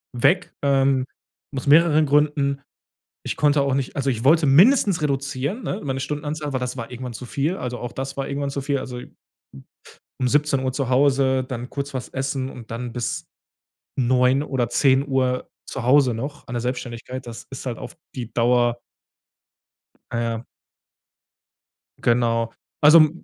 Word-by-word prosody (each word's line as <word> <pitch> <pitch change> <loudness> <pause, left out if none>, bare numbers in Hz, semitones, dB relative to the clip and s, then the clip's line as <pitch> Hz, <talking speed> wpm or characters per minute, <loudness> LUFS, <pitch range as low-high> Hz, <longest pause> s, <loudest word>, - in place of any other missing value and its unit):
weg, 175 +9 +2
ähm, 135 -1 +3 0.5
aus 135 - -4
mehreren 155 +1 +6
Gründen. 145 -1 +2 0.6
Ich - - -2
konnte 145 -1 +3
auch 140 -1 0
nicht 135 -1 -2
also, 140 0 0
ich 115 -2 -4
wollte 155 +3 +5
mindestens 190 - +5
reduzieren, 140 - -2
ne, 200 - -3
meine 135 -2 -2
Stundenanzahl, 150 +1 -4
weil 130 - 0
das 125 +1 -3
war 115 -1 -5
irgendwann 125 0 -6
zu 125 - -7
viel. 145 +9 -1
Also, 125 -1 -4
auch 120 - -5
das 135 +2 -5
war 135 0 -3
irgendwann 140 0 -2
zu 140 - -3
viel. 140 +1 0
Also, 125 -1 -6 1.2
um 125 - +2
17:00 140 -2 +1
zu 135 -1 -2
Hause, 130 0 +3
dann 125 -1 -6
kurz 140 0 -4
was 130 - -4
essen 135 0 -3
und 120 -4 -11
dann 120 +1 -5
bis 120 0 -3 0.7
21:00 130 +2 +3
oder 130 -5 -1
22:00 130 -1 +2 0.2
zu 135 - -4
Hause 130 +1 +4
noch 140 +6 -6
an 125 - -6
der 120 - -1
Selbstständigkeit. 125 +1 -5
Das 115 -1 -9
ist 135 - -7
halt 120 -3 -3
auf - - -9 0.2
die 120 -3 -6
Dauer 120 0 +2 1.4
Ja. 115 0 -2 1.6
Genau. 115 -1 +1 0.3
Also, 155 +1 +8
135 Hz, 155 wpm, -23 LUFS, 125-145 Hz, 1.6 s, Also